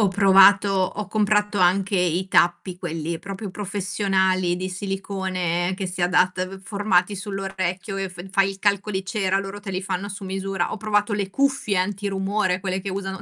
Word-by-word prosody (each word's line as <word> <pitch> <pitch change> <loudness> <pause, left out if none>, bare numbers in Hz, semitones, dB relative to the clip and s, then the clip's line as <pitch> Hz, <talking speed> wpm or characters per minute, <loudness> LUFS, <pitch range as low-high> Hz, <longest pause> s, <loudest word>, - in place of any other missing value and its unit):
Ho 210 - +5
provato 195 +1 +6
ho 195 +1 -1
comprato 210 0 +1
anche 190 +2 +3
i 180 +1 0
tappi 175 0 +2
quelli 165 -1 -4
proprio 195 +2 -6
professionali 190 -2 0
di 185 +1 -4
silicone 185 -2 -2
che 190 -1 -3
si 180 0 -6
adatta, 185 +1 +1
formati 200 -1 +1
sull' 195 0 -5
orecchio 190 +1 -3
e 195 -1 -2
f 180 0 -10
fai 195 0 +3
il 195 0 -10
calco 205 0 +1
di 190 0 -2
cera, 195 0 0
loro 195 +1 -6
te 205 -1 -7
li 185 +1 -2
fanno 190 +1 -3
su 200 0 -8
misura. 190 -1 -2
Ho - - -3
provato 210 0 0
le 200 -2 -2
cuffie 270 -6 +1
anti-rumore, 195 0 -1
quelle 190 -1 -2
che 195 +1 -5
usano 190 0 -4
195 Hz, 175 wpm, -23 LUFS, 185-200 Hz, -, provato